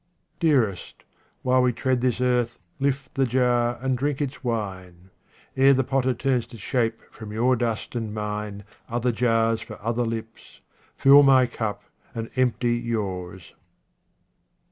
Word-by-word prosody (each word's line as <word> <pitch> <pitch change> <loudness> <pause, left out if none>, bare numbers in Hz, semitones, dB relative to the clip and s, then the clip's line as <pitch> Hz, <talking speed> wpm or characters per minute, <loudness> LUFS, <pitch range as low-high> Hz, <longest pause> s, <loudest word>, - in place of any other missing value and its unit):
Dearest, 130 - 0 0.4
while 130 0 +3
we 125 0 +3
tread 130 0 0
this 125 -2 0
earth, 125 -2 +1 0.2
lift 140 0 -1
the 135 -1 +1
jar 120 -1 +1
and 130 -1 +1
drink 140 +2 -1
its 140 -1 -4
wine; 95 -6 -5 0.4
ere 135 +1 +5
the 135 - +2
potter 130 -1 0
turns 130 -1 0
to 115 - -12
shape 115 +1 -1
from 110 -2 -10
your 120 +4 +2
dust 115 -2 -2
and 115 -3 -3
mine 105 -1 -4 0.3
other 120 +1 0
jars 115 -1 +1
for - - -9
other 115 +3 -1
lips, 115 -1 -6 0.4
fill 140 +1 +8
my 135 -2 +6
cup 110 -3 -4 0.3
and 115 0 -5
empty 125 -2 +1
yours. 95 -6 -4
120 Hz, 145 wpm, -24 LUFS, 110-130 Hz, 0.4 s, fill